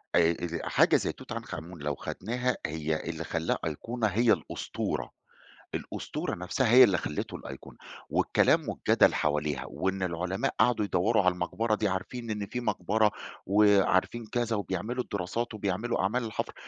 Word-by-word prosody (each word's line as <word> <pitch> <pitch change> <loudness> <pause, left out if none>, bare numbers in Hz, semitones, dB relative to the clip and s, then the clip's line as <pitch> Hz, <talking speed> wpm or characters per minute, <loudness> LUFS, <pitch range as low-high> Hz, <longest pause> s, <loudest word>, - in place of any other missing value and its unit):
آآ، 85 -1 +5
ال 85 0 -4
حاجة - - +5
زي - - +1
توت - - -13
عنخ - - -5
آمون 85 +1 -9
لو 75 -1 -1
خدناها 125 +3 -2
هي 80 +1 -2
اللي 80 0 -4
خلّاها 80 0 -1
أيقونة 110 +9 -2
هي 110 +3 +4
الأسطورة، - - -3 0.6
الأسطورة - - -4
نَفسها 100 +7 0
هي 130 +1 +9
اللي 95 -6 +3
خلّته 75 - -4
الأيقونة، 65 0 -10 0.3
والكلام - - +3
والجدل - - +3
حواليها، 75 -3 0
وإن 95 0 -2
العُلماء 90 +3 -1
قعدوا 110 -2 +3
يدوّروا 100 +3 +2
على 90 -1 +4
المقبرة 110 +5 -1
دي 105 -1 0
عارفين 115 +5 -4
إن 105 -1 -2
في 125 +4 -4
مقبرة، 105 0 +1 0.4
وعارفين 100 +2 +3
كذا، 115 0 -1
وبيعملوا 105 +6 -2
الدراسات 100 +5 -3
وبيعملوا 105 +2 -1
أعمال 115 +5 0
الحفر، 110 - -3
100 Hz, 150 wpm, -29 LUFS, 85-115 Hz, 0.6 s, هي